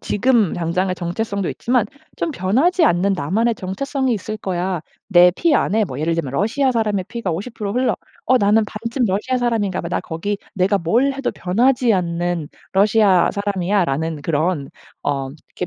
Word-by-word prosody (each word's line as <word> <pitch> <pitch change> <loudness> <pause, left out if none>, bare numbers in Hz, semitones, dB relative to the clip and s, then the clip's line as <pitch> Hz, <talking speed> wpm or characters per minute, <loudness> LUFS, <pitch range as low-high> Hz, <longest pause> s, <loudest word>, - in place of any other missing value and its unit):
지금 230 -3 +2
당장의 180 +2 -1
정체성도 200 +2 -3
있지만 240 -3 0 0.3
좀 330 - -2
'변하지 290 - +2
않는 195 - +3
나만의 205 +10 0
정체성이 260 +7 -2
있을 215 +1 -5
거야. 185 -3 -2 0.3
내 180 -2 +7
피 335 -3 +2
안에 215 -4 +2
뭐 130 -6 -7
예를 165 +2 0
들면 145 -6 -3
러시아 235 - +1
사람의 210 -5 0
피가 235 -6 -3
50% 205 +3 -4
흘러. 250 +2 +1 0.3
어 255 - +5
나는 210 0 +4
반쯤 230 +4 -3
러시아 210 +7 0
사람인가 220 -6 0
봐. 170 - -5
나 180 - -1
거기 190 +5 -3 0.2
내가 195 +2 +2
뭘 235 +11 +2
해도 275 -1 -2
변하지 240 +5 +2
않는 175 -3 -1 0.2
러시아 200 -2 +4
사람이야.'라는 175 -6 -1
그런 155 -1 -1 0.3
어 135 -2 -1
그렇게 155 +5 -8
200 Hz, 340 characters per minute, -20 LUFS, 175-230 Hz, 0.3 s, 내